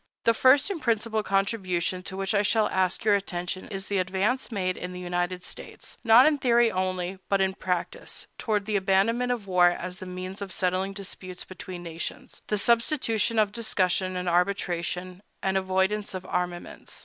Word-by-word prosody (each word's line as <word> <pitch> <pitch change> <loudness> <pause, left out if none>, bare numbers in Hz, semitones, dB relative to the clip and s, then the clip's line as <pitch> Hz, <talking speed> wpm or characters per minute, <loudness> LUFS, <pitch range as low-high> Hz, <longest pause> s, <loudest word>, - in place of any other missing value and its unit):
The 230 - +5
first 265 - +5
and 345 -5 -4
principal 225 -2 +1
contribution 195 -3 0
to 190 +1 -7
which 195 +1 -1
I 205 - +4
shall 215 +1 +2
ask 185 +2 0
your 210 - +5
attention 185 -2 -2
is 195 -2 -5
the 200 -1 0
advance 195 +8 0
made 185 -4 -1
in 180 0 -6
the 180 - -7
United 180 0 -2
States, - - -11
not 230 +2 +8
in 305 -2 +3
theory 240 -2 +4
only, 185 0 -2
but 195 - +3
in 190 0 +2
practice, 185 - -4
toward 210 -3 0
the 215 0 -1
abandonment 200 +6 +2
of 235 -5 -2
war 180 -2 +5
as 180 +1 -5
the 185 - -7
means 185 +2 -6
of 195 -1 -5
settling 185 +1 0
disputes 185 -2 -7
between 180 -1 -8
nations, 165 0 -6
the 210 - 0
substitution 230 0 +2
of 210 -2 +3
discussion 185 -4 0
and 180 0 -3
arbitration, 180 0 -1 0.2
and 190 0 +1
the 190 - +3
avoidance 190 +2 0
of 185 0 -6
armaments. 180 -1 -4
190 Hz, 180 wpm, -27 LUFS, 180-215 Hz, 0.2 s, not